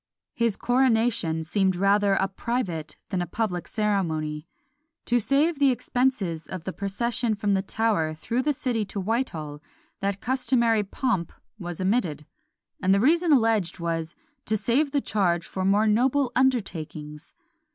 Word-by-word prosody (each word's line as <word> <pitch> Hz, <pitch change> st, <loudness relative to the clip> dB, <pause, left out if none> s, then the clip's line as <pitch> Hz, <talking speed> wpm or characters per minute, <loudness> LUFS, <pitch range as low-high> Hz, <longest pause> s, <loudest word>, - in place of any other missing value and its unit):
His 230 Hz, -3 st, +1 dB
coronation 230 Hz, -10 st, +1 dB
seemed 190 Hz, +3 st, +1 dB
rather 200 Hz, +1 st, +3 dB
a 195 Hz, -, +1 dB
private 190 Hz, -6 st, -3 dB
than 185 Hz, -3 st, -1 dB
a 175 Hz, -, -3 dB
public 180 Hz, -4 st, -2 dB
ceremony. 160 Hz, -8 st, -1 dB, 0.6 s
To 240 Hz, 0 st, +2 dB
save 285 Hz, +7 st, +2 dB
the 280 Hz, -1 st, +5 dB
expenses 245 Hz, -10 st, -1 dB
of 185 Hz, -3 st, -6 dB
the 190 Hz, -, -4 dB
procession 225 Hz, +3 st, -1 dB
from 205 Hz, 0 st, 0 dB
the 190 Hz, -, +2 dB
Tower 195 Hz, -7 st, 0 dB
through 235 Hz, +10 st, -2 dB
the 295 Hz, +3 st, +1 dB
city 245 Hz, -5 st, -1 dB
to 200 Hz, -, -5 dB
Whitehall, 175 Hz, -, -2 dB, 0.4 s
that 200 Hz, 0 st, -2 dB
customary 235 Hz, -2 st, +2 dB
pomp 200 Hz, -3 st, -2 dB, 0.3 s
was 175 Hz, -3 st, -6 dB
omitted; 185 Hz, -, 0 dB, 0.6 s
and 190 Hz, 0 st, +4 dB
the -, -, +3 dB
reason 330 Hz, -, +3 dB
alleged 225 Hz, -, +2 dB
was 165 Hz, -1 st, -3 dB, 0.3 s
"to 215 Hz, -, +2 dB
save 265 Hz, +8 st, +1 dB
the 285 Hz, 0 st, 0 dB
charge 175 Hz, -8 st, 0 dB
for 190 Hz, -, -4 dB
more 200 Hz, +3 st, +3 dB
noble 250 Hz, +5 st, +2 dB
undertakings!" 160 Hz, -, -2 dB
205 Hz, 145 wpm, -25 LUFS, 175-245 Hz, 0.6 s, the